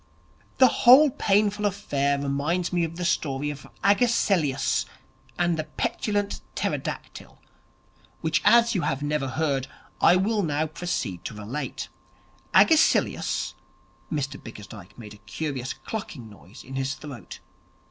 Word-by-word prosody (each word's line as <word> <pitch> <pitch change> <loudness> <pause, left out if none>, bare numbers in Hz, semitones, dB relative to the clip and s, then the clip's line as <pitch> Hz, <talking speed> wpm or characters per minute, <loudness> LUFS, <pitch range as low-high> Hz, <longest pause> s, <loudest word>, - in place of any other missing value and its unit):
The 260 - +7
whole 270 +4 +8
painful 205 -1 +1
affair 140 -8 -1
reminds 145 +6 -1
me 175 -1 +2
of 165 0 -3
the 175 +1 -4
story 145 -3 -1
of 140 -2 -10 0.2
Agesilaus 195 - +2 0.5
and 175 -1 +1
the 155 - -2
Petulant 205 +3 -2
Pterodactyl, - - -4 0.8
which - - +1
as 235 0 +5
you 185 - 0
have 135 -2 -2
never 145 -2 -1
heard, 135 -1 -1 0.3
I - - +6
will 205 +3 +1
now 155 -3 0
proceed 150 - -4
to 110 - -5
relate. 110 +8 -5 0.6
Agesilaus 320 -2 +3 0.3
' - - -34
Mr 140 -3 -3
Bickersdyke 105 -3 -11
made 105 -3 -10
a - - -14
curious 130 +5 -4
clucking 155 - -7
noise 105 +2 -14
in 135 0 -7
his 135 0 -1
throat. 135 - -10
150 Hz, 130 wpm, -25 LUFS, 135-195 Hz, 0.8 s, whole